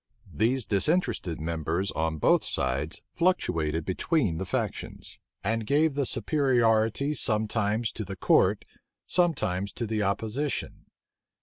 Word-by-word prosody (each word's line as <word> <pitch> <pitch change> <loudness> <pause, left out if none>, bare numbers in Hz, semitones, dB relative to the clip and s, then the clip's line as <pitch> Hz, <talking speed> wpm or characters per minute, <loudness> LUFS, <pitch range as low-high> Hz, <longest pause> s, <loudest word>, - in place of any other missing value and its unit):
These 115 - +1
disinterested 110 - 0
members 85 +4 -2
on 80 0 -1
both - - +3
sides 70 +5 -2
fluctuated 80 - 0
between 95 - 0
the 95 - -4
factions; - - -4 0.2
and 115 +2 0
gave 150 +6 +2
the 140 -2 0
superiority 120 -2 +2
sometimes 110 -2 0
to 110 - -5
the 95 -1 -6
court, - - +3 0.4
sometimes 100 - +1
to 120 - -3
the 110 -1 -1
opposition. 110 +8 -2
110 Hz, 115 wpm, -27 LUFS, 90-135 Hz, 0.4 s, both